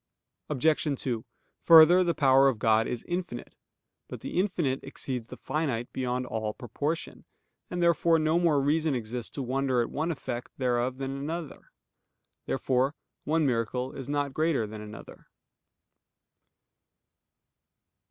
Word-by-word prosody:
Obj. 150 0 +1
2: 120 -4 -2 0.4
Further, 170 +2 +8
the 170 -2 0
power 135 -1 +5
of 130 -4 +1
God 110 +1 +3
is 120 - -4
infinite. 175 -8 -4 0.5
But - - -8
the - - -2
infinite 175 -9 0
exceeds 130 -3 -5
the - - -10
finite 135 -7 -2
beyond 125 0 -2
all 110 -3 -3
proportion; 145 +7 -4 0.5
and 175 -1 -2
therefore 170 -1 +4
no 155 +2 +2
more 165 -5 +3
reason 150 +1 +1
exists 120 0 -4
to 140 - -4
wonder 130 0 0
at 120 - -1
one 160 +3 -1
effect 125 -5 -6
thereof 125 0 0
than 135 0 -4
at - - -6
another. 160 +1 -6 0.8
Therefore 130 +2 0 0.3
one 160 +1 +2
miracle 125 +1 -1
is 135 -2 -7
not 145 -1 -1
greater 155 -7 +1
than 105 0 -8
another. 105 +1 -11
135 Hz, 135 wpm, -28 LUFS, 125-155 Hz, 0.8 s, Further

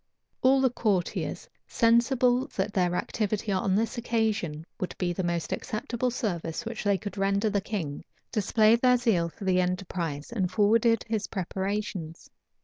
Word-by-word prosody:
All 265 +1 +5
the 260 -2 +3
courtiers, 205 -8 -1 0.2
sensible 245 +2 +3
that 200 +2 -1
their 180 -2 +1
activity 215 +1 -1
on 190 0 +1
this 225 +3 0
occasion 220 -10 -1
would 185 - -4
be 175 -1 -1
the 190 - -2
most 170 -1 -1
acceptable 235 +3 -2
service 185 -4 -3
which 230 0 -5
they 200 -1 +2
could 200 +1 -6
render 200 +2 +1
the 200 -1 +1
king, 180 -9 -4 0.3
displayed 220 +2 +3
their 250 -1 +5
zeal 205 -9 +1
for 185 - -12
the 185 -1 +3
enterprise, 180 -4 -3
and 190 -6 -1
forwarded 225 +4 +3
his 220 -2 -1
preparations. 190 -3 -4
205 Hz, 150 wpm, -27 LUFS, 180-230 Hz, 0.3 s, All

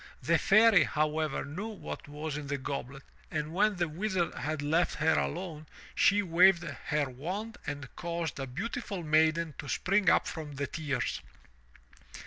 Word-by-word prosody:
The - - +3
Fairy, 215 0 +6
however, 155 0 -1
knew 170 +10 -5
what 215 -8 -7
was 150 +1 -5
in 150 -1 -5
the 140 0 -1
goblet, 135 0 -5 0.3
and 155 0 -3
when 205 +3 +3
the 175 -1 0
Wizard 180 +2 -1
had 150 +2 -3
left 160 +4 +1
her 160 +1 +2
alone, 160 -3 -2 0.3
she 205 +1 +4
waved 175 0 +5
her 150 -3 -2
wand 185 - -5
and 145 -2 -4
caused 170 -4 -3
a 135 - -3
beautiful 195 - -4
maiden 160 +1 +2
to 145 - -6
spring 195 -1 +2
up - - +4
from 155 -3 -6
the 140 +1 -2
tears. 140 - -2
160 Hz, 155 wpm, -30 LUFS, 145-185 Hz, 0.3 s, Fairy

